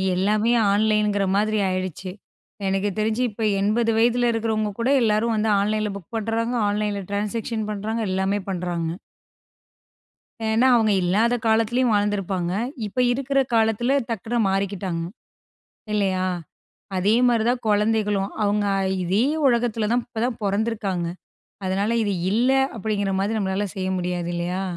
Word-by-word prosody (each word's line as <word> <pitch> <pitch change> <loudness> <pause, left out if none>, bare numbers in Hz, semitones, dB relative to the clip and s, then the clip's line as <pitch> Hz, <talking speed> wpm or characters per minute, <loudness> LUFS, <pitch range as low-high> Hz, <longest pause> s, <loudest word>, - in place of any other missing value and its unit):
எல்லாமே 210 +5 +2 0.2
ஆன்லைங்குற 210 -1 +2
மாரி 215 +1 +1
ஆயிடுச்சு. 185 0 -4 0.6
எனக்கு 195 +1 0
தெரிஞ்சு 220 +3 0
இப்ப 220 +1 -6 0.2
80 225 +3 +2
வயதில 240 +1 +3
இருக்கிறவங்க 220 -2 -1
கூட 235 +3 +1
எல்லாரும் 225 +1 +2
வந்து 215 +1 +1
ஆன்லைன்ல 210 +1 0
புக் 195 +3 -15
பண்றாங்க, 225 +2 -1
ஆன்லைன்ல 205 -1 -1
ட்ரான்சாக்ஷன் 215 +2 -2
பண்றாங்க, 215 +2 -3
எல்லாமே 190 +2 0
பண்றாங்க. 175 -3 -2 1.6
ஏன்னா, 225 +4 +3
அவுங்க 220 -2 +3
இல்லாத 210 +7 +2
காலத்திலேயும் 225 +2 +2
வாழ்ந்திருப்பாங்க. 195 -4 0 0.3
இப்ப 210 +5 -4
இருக்கிற 275 +1 0
காலத்தில 225 +3 +2
டக்குனு 230 +2 -2
மாறிக்கிட்டாங்க, 195 -3 -2 0.9
இல்லயா? 190 -3 +1 0.7
அதேமாரி 225 +5 +3
தான் 245 0 0
குழந்தைகளும். 210 -1 +1
அவுங்க 205 0 +1 0.4
இதே 195 +7 +2 0.2
உலகத்தில 235 -4 +1
தான் 245 0 +2
இப்ப 230 -2 -6
தான் 245 -2 -2
பொறந்துருக்காங்க. 200 -3 -1 0.6
அதனால 195 +3 0
இது 205 - 0 0.2
இல்ல 235 +5 +2 0.3
அப்படிங்கிற 205 -2 -1
மாரி 205 +3 0
நம்மளால 190 0 -1
செய்ய 185 -1 -2
முடியாது 180 -1 -2
இல்லயா? 175 +2 -2
210 Hz, 125 wpm, -23 LUFS, 195-225 Hz, 1.6 s, வயதில